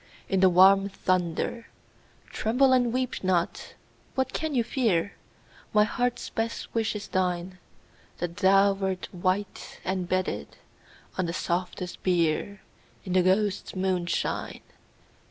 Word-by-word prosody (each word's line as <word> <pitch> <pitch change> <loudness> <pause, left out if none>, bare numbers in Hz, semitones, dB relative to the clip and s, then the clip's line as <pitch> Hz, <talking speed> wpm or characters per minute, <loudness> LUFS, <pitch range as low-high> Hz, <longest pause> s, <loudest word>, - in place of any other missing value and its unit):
In 190 - +1
the 190 0 +6
warm 195 +2 +6
thunder: 185 +4 -1 0.6
(Tremble 260 +4 +3
and 245 -2 +3
weep 255 -2 -2
not 180 -2 +1
I - - -12 0.4
What 260 -1 -1
can 315 -3 -2
you 240 - +3
fear?) 220 -7 0 0.6
My 210 - +7
heart's 245 +3 -2
best 225 +1 -3
wish 225 -1 0
is 210 - -5
thine, 185 -1 -1 0.3
— - - -31
That 175 -1 -4
thou 195 0 +5
wert 190 -1 -3
white, 185 +3 -2
and 185 -1 -2
bedded 185 - -2 0.6
On 185 - +1
the 170 - -3
softest 180 0 -3
bier. 180 +2 0 0.4
In 185 - -3
the 185 - +5
ghosts* 195 +2 +1
moonshine. 185 -2 -1
190 Hz, 135 wpm, -27 LUFS, 180-215 Hz, 0.6 s, My